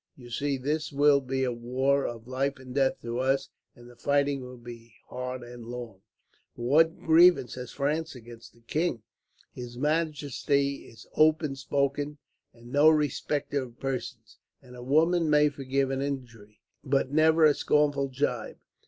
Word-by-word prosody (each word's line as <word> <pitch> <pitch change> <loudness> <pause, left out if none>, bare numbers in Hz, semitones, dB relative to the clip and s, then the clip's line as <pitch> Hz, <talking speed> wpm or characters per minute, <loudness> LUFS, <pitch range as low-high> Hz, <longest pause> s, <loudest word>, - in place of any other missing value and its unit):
You 120 -2 -13
see, 140 +3 -1
this 150 +4 -2
will 145 0 +4
be 130 0 -2
a 125 - 0
war 130 +4 0
of 115 -1 -7
life 135 +2 -1
and 130 -1 -11
death 135 -1 +1
to 120 +1 -3
us, 135 +1 0 0.3
and 120 -1 -15
the 120 - -15
fighting 140 +1 0
will 125 0 -9
be 120 -1 -12
hard 125 0 -5
and 120 -1 -10
long." 120 -5 -8 0.5
"But 120 - -8
what 160 +7 +3
grievance 165 -5 +5
has 125 -1 -7
France 150 +2 -2
against 120 -1 -13
the 115 - -23
king?" 120 -1 -2 0.5
"His 120 -1 -8
majesty 145 -2 -1
is 110 -2 -15
open 155 -2 +3
spoken, 140 +2 -1 0.3
and 120 +1 -15
no 145 +3 +6
respecter 145 -1 0
of 120 -2 -10
persons; 120 -5 -5 0.2
and 125 -2 -15
a 125 - -10
woman 160 +5 +2
may 150 0 +5
forgive 135 -1 -1
an 135 0 -2
injury, 120 -7 -6 0.2
but 135 -1 0
never 160 +1 +4
a 150 - +6
scornful 145 -1 +1
gibe. 135 +2 -3
135 Hz, 160 wpm, -28 LUFS, 125-145 Hz, 0.5 s, no